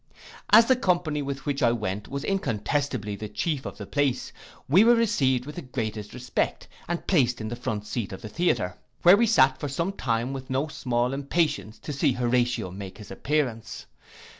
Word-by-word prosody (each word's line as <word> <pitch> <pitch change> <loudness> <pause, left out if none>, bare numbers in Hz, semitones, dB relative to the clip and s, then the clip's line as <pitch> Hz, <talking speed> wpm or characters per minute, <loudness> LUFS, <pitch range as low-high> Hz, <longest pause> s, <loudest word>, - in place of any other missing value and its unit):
As 225 +2 +8
the 260 - +4
company 175 - 0
with 135 -1 -5
which 145 -1 -1
I 120 -3 +4
went 105 -3 -3
was 140 +1 -4
incontestably 130 - -1
the 105 +1 -6
chief 145 +5 -2
of - - -8
the - - -7
place, 140 -3 -1 0.3
we 180 +10 +6
were 240 +1 +6
received 130 - +2
with 150 +3 -9
the - - -3
greatest 110 -6 -5
respect, 125 0 -2 0.2
and 175 0 -3
placed 125 -9 +2
in 110 -1 -4
the 120 - -4
front 110 -3 -4
seat 105 -2 -3
of 95 - -8
the - - -5
theatre; 105 - 0 0.3
where 175 +2 +9
we 230 +3 +3
sate 130 -11 +4
for 145 - -3
some 165 +7 -1
time 120 - -1
with 130 -1 -7
no 135 +3 0
small 125 -1 -1
impatience 140 -5 -1
to 150 - -6
see 140 -1 +2
Horatio 120 -4 0
make 95 0 -8
his 105 - -11
appearance. 125 -1 -2
130 Hz, 190 wpm, -26 LUFS, 115-150 Hz, 0.3 s, where